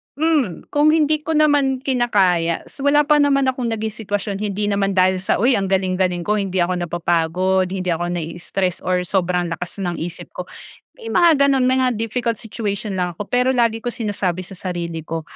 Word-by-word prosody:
hmm, 295 Hz, -, 0 dB
kung 295 Hz, +1 st, +3 dB
hindi 310 Hz, -1 st, +3 dB
ko 315 Hz, +1 st, -3 dB
naman 285 Hz, -4 st, +2 dB
kinakaya 190 Hz, -10 st, +1 dB
s -, -, -12 dB
wala 285 Hz, +2 st, +4 dB
pa 300 Hz, 0 st, +3 dB
naman 280 Hz, -1 st, +3 dB
akong 255 Hz, -2 st, -1 dB
naging 220 Hz, -1 st, -2 dB
sitwasyon, 205 Hz, -2 st, -3 dB
hindi 205 Hz, 0 st, -1 dB
naman 200 Hz, -1 st, 0 dB
dahil 185 Hz, 0 st, +3 dB
sa, 185 Hz, -, 0 dB
'Uy 240 Hz, +6 st, +3 dB
ang 195 Hz, -, -2 dB
galing-galing 185 Hz, -2 st, 0 dB
ko 210 Hz, +3 st, 0 dB
hindi 190 Hz, -2 st, 0 dB
ako 180 Hz, +1 st, -1 dB
napapagod 175 Hz, +2 st, 0 dB
hindi 185 Hz, -1 st, -2 dB
ako 175 Hz, +1 st, -1 dB
nai-stress 175 Hz, +2 st, -3 dB
or 180 Hz, 0 st, +1 dB
sobrang 180 Hz, -2 st, 0 dB
lakas 180 Hz, +3 st, -5 dB
ng 175 Hz, -2 st, -3 dB
isip 170 Hz, +2 st, -7 dB
ko." -, -, -7 dB, 0.5 s
May 460 Hz, -, -11 dB
mga 330 Hz, -8 st, +4 dB
gano'n, 270 Hz, -2 st, +2 dB
may 260 Hz, +1 st, +3 dB
mga 255 Hz, -1 st, +2 dB
difficult 230 Hz, +1 st, -1 dB
situation 210 Hz, -3 st, -4 dB
lang 180 Hz, -1 st, -1 dB
ako, 205 Hz, +4 st, -7 dB
pero 250 Hz, +1 st, +2 dB
lagi 230 Hz, -2 st, +2 dB
ko 225 Hz, -, -14 dB
sinasabi 195 Hz, -5 st, -2 dB
sa 185 Hz, 0 st, -10 dB
sarili 170 Hz, -3 st, -5 dB
ko, 165 Hz, 0 st, -4 dB
200 Hz, 190 wpm, -20 LUFS, 180-255 Hz, 0.5 s, wala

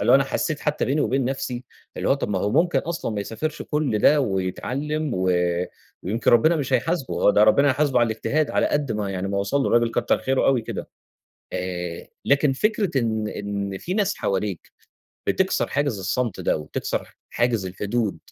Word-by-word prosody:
اللي 100 Hz, -, +4 dB
هو -, -, +9 dB
أنا 135 Hz, -, +2 dB
حسيت 150 Hz, +2 st, -2 dB
حتى 150 Hz, 0 st, 0 dB
بيني 140 Hz, +4 st, +1 dB
وبين 135 Hz, -1 st, +1 dB
نَفسي، 125 Hz, -1 st, -3 dB, 0.3 s
اللي -, -, -1 dB
هو -, -, +5 dB
طَب 140 Hz, -, -3 dB
ما 100 Hz, -, 0 dB
هو 100 Hz, +3 st, 0 dB
ممكن 170 Hz, +8 st, +3 dB
أصلًا 165 Hz, -7 st, -3 dB
ما 105 Hz, -1 st, -2 dB
يسافرش 135 Hz, +10 st, -4 dB
كل 150 Hz, -7 st, 0 dB
ده 145 Hz, +7 st, +5 dB
ويتعلّم 130 Hz, +9 st, -2 dB
و 95 Hz, 0 st, +1 dB, 0.7 s
ويمكن 110 Hz, +6 st, +1 dB
ربنا 155 Hz, +8 st, +5 dB
مش 135 Hz, -3 st, -3 dB
هيحاسبُه، 140 Hz, +2 st, 0 dB
هو -, -, +4 dB
ده 105 Hz, -, +4 dB
ربنا 140 Hz, +7 st, +5 dB
هيحاسبُه 135 Hz, -2 st, +2 dB
على 120 Hz, -, +4 dB
الاجتهاد 140 Hz, +7 st, 0 dB
على -, -, +2 dB
قد 145 Hz, -5 st, 0 dB
ما 105 Hz, -2 st, -2 dB
يعني 95 Hz, 0 st, -3 dB
ما 100 Hz, 0 st, -1 dB
وصل 100 Hz, +8 st, 0 dB
لُه -, -, 0 dB
الراجل 120 Hz, 0 st, +3 dB
كتّر 120 Hz, -, +1 dB
خيرُه 135 Hz, 0 st, +1 dB
أوي 130 Hz, -4 st, +3 dB
كده، -, -, -6 dB, 0.7 s
آآ، 90 Hz, -2 st, -4 dB, 0.2 s
لكن 140 Hz, 0 st, +3 dB
فكرة 200 Hz, -2 st, +1 dB
إن 110 Hz, -2 st, -1 dB
إن 100 Hz, -2 st, -4 dB
فيه 180 Hz, -, -4 dB
ناس 205 Hz, -1 st, +1 dB
حواليك، 100 Hz, -2 st, -2 dB, 0.6 s
بتِكسَر -, -, +1 dB
حاجز 140 Hz, -6 st, -1 dB
الصمت 105 Hz, +3 st, -2 dB
ده، -, -, +1 dB
وتِكسَر 75 Hz, -, -4 dB
حاجز 120 Hz, -5 st, 0 dB
الحدود 105 Hz, +1 st, -2 dB
120 Hz, 190 wpm, -23 LUFS, 100-145 Hz, 0.7 s, هو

